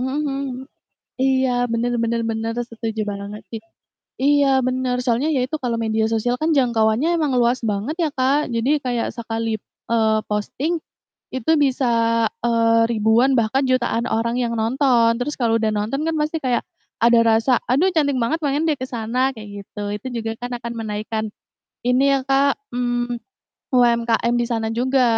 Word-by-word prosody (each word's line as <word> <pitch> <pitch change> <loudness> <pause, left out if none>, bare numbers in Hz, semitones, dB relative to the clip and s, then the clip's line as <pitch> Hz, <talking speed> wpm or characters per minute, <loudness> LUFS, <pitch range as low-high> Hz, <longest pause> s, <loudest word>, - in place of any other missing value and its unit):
mhm 255 - -1
mhm 285 +3 -2
mhm, 275 -1 -2 0.8
iya, 265 -1 +2 0.2
bener 235 +1 0
bener 230 0 0
bener, 225 +1 -2 0.2
setuju 225 -1 -4
banget, 200 +1 -7
sih. 225 -2 -5 0.6
Iya, 285 0 +4 0.2
bener, 255 -1 0
soalnya 250 +4 +1
ya 260 - +1
itu 310 - -2
kalau 235 -2 0
media 220 0 +1
sosial 245 +3 0
kan 320 0 +2
jangkauannya 240 +1 +2
emang 300 -4 0
luas 240 +2 +2
banget 210 +8 -2
ya, 330 -3 +1
Kak, 270 +1 +1
jadi 230 +4 0 0.2
kayak, 240 -2 0
sekali, 225 -1 -2 0.3
eee, 220 -1 +3
posting 265 +11 -1 0.6
itu 260 +3 -1
bisa, 270 -1 +1 0.6
eee, 230 -1 +3
ribuan, 230 +4 +3
bahkan 240 +4 +1
jutaan 240 -2 +1
orang 235 +2 0
yang 235 -1 -1
nonton, 235 0 +3
terus 295 +4 -2
kalau 230 -2 +1
udah 220 - +1
nonton 215 +7 -2
kan 325 - 0
pasti 305 +2 -1
kayak 250 -4 0 0.4
ada 235 0 +6
rasa, 225 +2 +3
"Aduh, 290 +10 +3
cantik 300 -5 +1
banget, 315 +8 0
pengen 290 0 0
deh 295 - -1
ke 260 - -4
sana," 250 +3 -1
kayak 215 -3 -10 0.2
gitu, 205 - -8 0.2
itu 210 - -11 0.2
juga 225 - -3
kan 245 0 -4
akan 235 0 -4
menaikkan 220 0 -3 0.6
ini 250 +2 +3
ya, 275 - +3
Kak, 275 +1 +2 0.2
mmm, 245 0 -1 0.6
UMKM 235 -1 +3
di 240 - +1
sana 225 -2 -1
juga 255 +3 +2
240 Hz, 165 wpm, -21 LUFS, 225-270 Hz, 0.8 s, ada